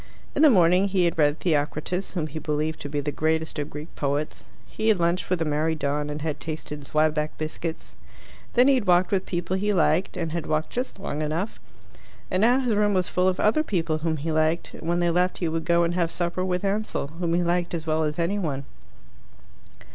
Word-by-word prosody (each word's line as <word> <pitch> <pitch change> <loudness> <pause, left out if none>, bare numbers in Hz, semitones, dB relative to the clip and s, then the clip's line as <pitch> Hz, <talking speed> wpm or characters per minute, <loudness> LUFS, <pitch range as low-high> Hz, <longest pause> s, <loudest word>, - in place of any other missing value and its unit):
In - - 0
the 310 - +8
morning 180 -3 +5
he 185 -2 +2
had 170 -1 -1
read 145 0 +3
Theocritus, 155 +3 -1
whom 170 -5 -1
he 155 +1 -6
believed 155 +1 -2
to 145 - -6
be 145 0 -1
the 145 +1 -2
greatest 160 +1 -1
of 145 - -3
Greek 150 +3 -9
poets; 145 +1 -2 0.2
he 220 - -4
had 215 -4 +4
lunched 170 +2 0
with 180 -2 +1
a - - -3
merry 155 +2 0
don 145 0 -1
and 150 0 -5
had 150 -2 -2
tasted 150 0 -6
Zwieback 155 0 +1
biscuits; 160 +1 -5 0.6
then 250 +2 +6
he 280 - +6
had 245 -7 0
walked 180 0 +4
with 190 -2 0
people 175 +1 -2
he 205 +2 0
liked, 180 -1 +2
and 165 -3 -2
had 170 -1 -3
walked 155 0 -1
just 250 -2 -3
long 155 -6 -4
enough; 160 +7 -2 0.7
and 185 - +1
now 245 +4 +5
his 245 -3 +1
room 205 -1 +2
was 185 -1 +1
full 180 +1 +2
of 185 0 +1
other 220 +9 +3
people 165 - -1
whom 160 0 -1
he 155 +3 -3
liked, 155 +2 +1
and 165 - -6
when 175 0 +1
they 175 -1 +2
left 180 +2 +1
he 175 - -1
would 160 0 -2
go 170 0 +3
and 170 0 0
have 170 -2 +1
supper 175 +1 -2
with 180 +1 -1
Ansell, 205 -5 -1
whom 170 -2 0
he 175 - +2
liked 175 0 0
as 165 -1 -5
well 160 0 +1
as 150 0 -2
any 175 +5 0
one. 140 -6 -3
170 Hz, 225 wpm, -25 LUFS, 155-185 Hz, 0.7 s, the